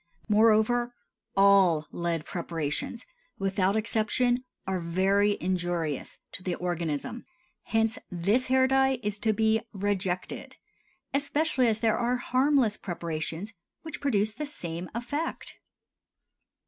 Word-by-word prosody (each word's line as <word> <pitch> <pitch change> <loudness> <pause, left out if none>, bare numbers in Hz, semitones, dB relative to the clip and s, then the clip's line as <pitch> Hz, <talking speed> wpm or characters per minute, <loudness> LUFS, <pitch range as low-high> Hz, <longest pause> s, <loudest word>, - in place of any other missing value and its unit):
Moreover, 225 +3 +3 0.4
all 195 -5 +5
lead 170 -2 -2
preparations 170 - -3 0.3
without 195 0 +1
exception 230 +3 +1 0.2
are 190 -1 -1
very 195 +4 +2
injurious 175 -5 -2
to - - -6
the 180 -1 -2
organism; 175 +4 -3 0.4
hence 225 0 +1
this 200 +9 +1
hair 260 0 +4
dye 265 0 +3
is 210 0 -1
to 220 - +2
be 220 +1 +2
rejected, 190 -2 -2 0.6
especially 280 -2 +1
as 220 -1 0
there 225 -2 +2
are 245 +1 +1
harmless 255 -3 +2
preparations 170 +3 -4 0.3
which 315 -1 -7
produce 215 -7 +1
the 300 +4 -4
same 175 - -6
effect. 285 +7 -4
210 Hz, 110 wpm, -28 LUFS, 180-245 Hz, 0.6 s, all